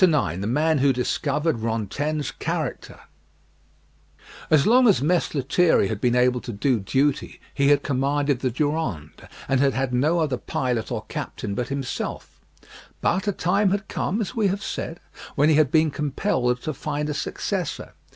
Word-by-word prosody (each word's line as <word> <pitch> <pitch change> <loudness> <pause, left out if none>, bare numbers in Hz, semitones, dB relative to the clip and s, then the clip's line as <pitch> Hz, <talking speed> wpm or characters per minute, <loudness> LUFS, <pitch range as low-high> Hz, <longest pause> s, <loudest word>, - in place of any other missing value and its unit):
IX 145 - +3
THE 100 - -2
MAN 150 +5 +2
WHO 135 0 +4
DISCOVERED 145 +3 -1
RANTAINE'S 115 +7 -2
CHARACTER - - -4 1.5
As 150 -3 +4
long 250 +2 +5
as 205 - +5
Mess 170 +1 +1
Lethierry 145 - +3
had 110 -2 -4
been 125 -1 +2
able 125 0 +3
to 120 - -6
do 120 +3 +1
duty, 135 +9 0
he 140 -1 +2
had 145 0 +4
commanded 140 0 0
the 130 - 0
Durande, 125 - -3 0.2
and 135 -1 +2
had 135 -1 +2
had 135 -1 -1
no 150 +7 +2
other 150 -6 0
pilot 120 -3 -2
or - - -3
captain 100 - -5
but 120 +4 -2
himself; 140 -2 -5 0.6
but 190 +4 0
a - - +3
time 195 +3 +1
had 200 +2 -1
come, 200 - -2
as 210 - -3
we 220 -4 +1
have 195 +2 -2
said, 165 +1 -5 0.4
when 145 +2 +4
he 155 - +4
had 150 -3 +4
been 155 +1 +3
compelled 135 -4 -1
to 155 - -2
find 150 +2 -3
a 150 - -2
successor. - - -3
145 Hz, 170 wpm, -24 LUFS, 125-160 Hz, 1.5 s, long